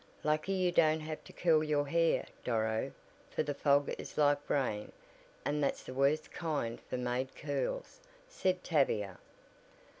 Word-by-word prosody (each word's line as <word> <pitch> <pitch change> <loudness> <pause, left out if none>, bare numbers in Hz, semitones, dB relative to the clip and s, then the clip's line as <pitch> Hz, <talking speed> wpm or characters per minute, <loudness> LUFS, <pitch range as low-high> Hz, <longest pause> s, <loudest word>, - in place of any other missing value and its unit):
"Lucky 155 +5 +1
you 185 -2 +2
don't 160 -2 +4
have 155 0 -5
to - - -11
curl 160 -3 +3
your 145 -2 +1
hair, 165 +2 +2 0.2
Doro, 110 -2 0 0.4
for - - 0
the 145 - -2
fog 140 0 +3
is - - -8
like 145 -1 +3
rain, 110 -7 0 0.5
and 145 0 +1
that's 140 - 0
the - - -7
worst 140 +4 +2
kind 145 -9 -2
for 125 - -1
made 125 +1 -2
curls," 155 - -3 0.3
said 185 - 0
Tavia. 105 - +1
145 Hz, 150 wpm, -33 LUFS, 130-160 Hz, 0.5 s, don't